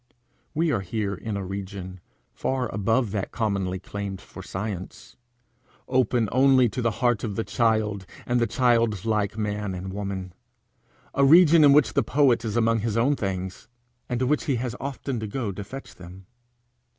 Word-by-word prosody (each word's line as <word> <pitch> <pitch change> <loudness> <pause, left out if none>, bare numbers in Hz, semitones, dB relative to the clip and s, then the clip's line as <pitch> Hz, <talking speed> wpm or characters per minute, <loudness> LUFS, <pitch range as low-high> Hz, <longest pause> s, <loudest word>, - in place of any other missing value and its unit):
We 165 +1 +2
are 115 - +1
here 100 +1 -2
in 105 +1 -4
a 100 - -4
region 95 -1 -6 0.3
far 130 -3 -2
above 110 +3 +1
that 100 -2 -3
commonly 100 -5 -1
claimed 100 0 -6
for - - -11
science, 95 -1 -6 0.7
open 125 -3 +2
only 130 -1 +5
to 125 - -4
the 115 - +2 0.2
heart 120 -3 +2
of 105 -4 -3
the 115 - -1
child 110 -5 0 0.2
and 120 0 +1
the 115 - +2
childlike 110 -3 +1
man 105 -2 -2
and 95 +1 -6
woman 95 -2 -4 0.8
a 140 - +2
region 165 +2 +7
in 145 - +8
which 145 0 +4
the - - +3
poet 130 -5 +3
is 110 -1 -2
among 115 0 +3
his 110 0 -1
own 135 +5 +3
things, 95 -4 -4 0.4
and 125 -1 -1
to - - +2
which 150 +5 +1
he 140 -5 +1
has 120 0 -3
often 135 -2 -4
to 110 - -4
go 110 -1 -3
to 100 +2 -6
fetch 125 0 -9
them. 90 +1 -12
110 Hz, 175 wpm, -25 LUFS, 100-125 Hz, 0.8 s, in